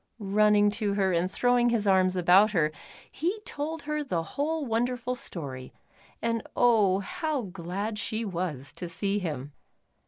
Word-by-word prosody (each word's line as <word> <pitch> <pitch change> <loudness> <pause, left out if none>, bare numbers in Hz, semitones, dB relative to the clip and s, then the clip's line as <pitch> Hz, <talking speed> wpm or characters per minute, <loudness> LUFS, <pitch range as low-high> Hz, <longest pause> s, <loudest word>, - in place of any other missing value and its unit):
Running 210 0 +3
to 205 -1 -1
her 190 -2 +2
and 170 +2 +1
throwing 245 +3 +2
his 230 -3 +1
arms 185 -1 +4
about 185 +4 +5
her, 155 -5 +2 0.4
he 360 +8 -2
told 315 -3 -5
her 300 0 -2
the 175 - -2
whole 300 - -2
wonderful 245 +1 -1
story, 140 - -6 0.5
and 230 -1 0
oh, 210 -6 +4
how 300 - -2
glad 195 +3 -4
she 225 +1 -2
was 170 -8 -4
to 175 - -5
see 200 +4 -1
him. 145 -6 -5
205 Hz, 150 wpm, -28 LUFS, 180-245 Hz, 0.5 s, about